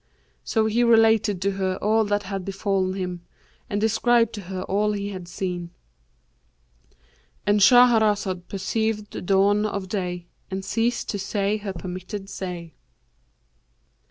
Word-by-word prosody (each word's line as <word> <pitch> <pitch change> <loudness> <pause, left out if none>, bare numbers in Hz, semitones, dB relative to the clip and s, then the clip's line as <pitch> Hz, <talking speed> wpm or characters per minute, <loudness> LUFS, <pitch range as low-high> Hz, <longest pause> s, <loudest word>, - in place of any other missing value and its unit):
So 220 -2 +1
he 225 +2 +2
related 225 -4 +4
to 200 - +2
her 190 -1 -1
all 220 +1 +2
that 205 0 0
had 195 -1 -4
befallen 195 -1 -1
him 180 -2 -4 0.5
and 205 - -1
described 230 +1 +2
to 210 - -6
her 185 0 -5
all 210 +2 0
he 200 0 -3
had 185 -3 -7
seen,"—And - - -7
Shahrazad 210 -5 +4
perceived 210 +1 -2
the - - -6
dawn 200 +2 +3
of 200 -2 -4
day 180 -3 -3 0.2
and 190 0 -4
ceased 230 +4 0
to 205 - -2
say 200 +1 -1
her 205 -2 -5
permitted 185 +3 -6
say. 175 -4 -6
195 Hz, 130 wpm, -24 LUFS, 180-210 Hz, 0.5 s, related